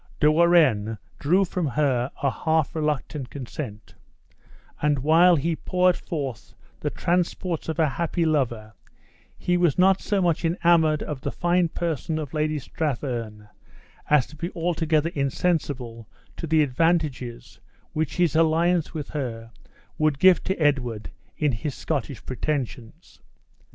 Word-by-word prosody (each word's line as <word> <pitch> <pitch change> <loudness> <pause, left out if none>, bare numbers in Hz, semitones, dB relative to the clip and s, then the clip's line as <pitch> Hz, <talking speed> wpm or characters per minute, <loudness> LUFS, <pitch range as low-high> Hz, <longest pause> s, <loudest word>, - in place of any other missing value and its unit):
De 150 0 +5
Warenne 155 -11 +3 0.2
drew 180 +7 +3
from 180 -2 -2
her 135 -3 +1
a 140 - +3
half 160 +1 0
reluctant 150 -3 -2
consent; 125 -5 -7 0.9
and, 150 -1 +2
while 165 +6 +5
he 165 +2 0
poured 180 +2 +2
forth 140 -11 -6 0.2
the - - -2
transports 175 -1 -1
of 160 - -2
a 160 -2 +3
happy 170 +4 -1
lover, 120 -8 -1 0.6
he 180 0 0
was 175 -5 +2
not 190 +1 +4
so 205 -2 0
much 175 -3 +1
enamored 165 -2 +3
of 145 -3 -5
the - - -2
fine 175 0 +1
person 160 -1 -2
of 150 -3 -5
Lady 155 0 0
Strathearn 120 -8 -4 0.6
as 150 -4 +4
to 155 - -15
be 170 +3 -4
altogether 165 -2 0
insensible 135 -6 -2 0.3
to 165 - -5
the 155 0 +4
advantages 145 -4 -1 0.3
which 155 -2 -2
his 175 -3 +2
alliance 165 +1 +2
with 150 -2 -5
her 115 -6 -5 0.5
would 155 -2 +2
give 185 +3 +5
to 190 - -1
Edward 125 -8 0 0.3
in 150 -2 +1
his 125 +5 -4
Scottish 140 -5 -4
pretensions. 130 +1 -4
155 Hz, 135 wpm, -24 LUFS, 130-170 Hz, 0.9 s, De